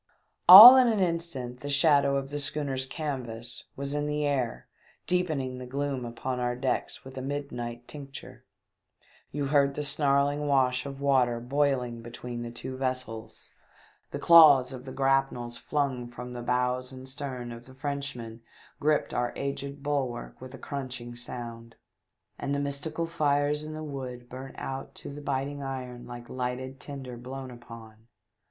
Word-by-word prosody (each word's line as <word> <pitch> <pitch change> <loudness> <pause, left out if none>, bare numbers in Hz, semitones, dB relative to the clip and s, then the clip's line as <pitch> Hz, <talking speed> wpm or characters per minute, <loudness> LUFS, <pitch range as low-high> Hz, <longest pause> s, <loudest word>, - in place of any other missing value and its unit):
All 225 +8 +14
in 255 -1 +6
an 220 -3 +2
instant 165 -9 -2
the 145 - -6
shadow 140 -1 +4
of 135 0 -4
the 145 - -3
schooner's 140 -2 -2
canvas 120 -6 -4
was 140 +1 -3
in 145 0 -1
the 150 0 -1
air 130 -5 -1 0.4
deepening 155 -8 0
the 125 - -8
gloom 135 -1 -2
upon 125 +2 -4
our 120 0 -1
decks 130 +1 -2
with 135 0 -8
a - - -4
midnight 120 -4 -5
tincture; 140 -2 -10 0.9
you 145 0 -2
heard 140 -1 +4
the 150 - -2
snarling 145 0 +1
wash 130 -1 +2
of 135 0 -8
water 130 -4 +2
boiling 125 -2 0
between 120 +1 -7
the 120 - -5
two 120 +2 -7
vessels; 130 -4 -4 0.6
the - - -5
claws 145 -6 +7
of 130 0 -9
the 130 - -7
grapnels 135 -3 0
tlung 130 -5 -1
from 125 +1 -8
the 120 - -6
bows 125 +1 0
and 130 0 -10
stern 130 -3 -5
of 120 +1 -10
the 130 - -14
Frenchman 135 -5 -5 0.4
gripped 150 0 +1
our 120 0 0
aged 140 0 -5
bulwark 135 -6 -3
with 130 +1 -9
a - - -9
crunching 130 -4 -6
sound, 115 -1 -8 0.6
and 140 - -2
the - - -1
mystical 145 +4 -3
fires 150 -2 +1
in 155 0 -7
the 155 - -6
wood 130 -4 -6
burnt 130 +1 -9
out 135 0 -6
to - - -9
the 145 - -8
biting 140 0 -2
iron 130 -3 -6
like 120 0 -9
lighted 130 +1 -4
tinder 130 -4 -7
blown 130 +2 -7
upon. 115 -2 -13
135 Hz, 160 wpm, -28 LUFS, 125-145 Hz, 0.9 s, All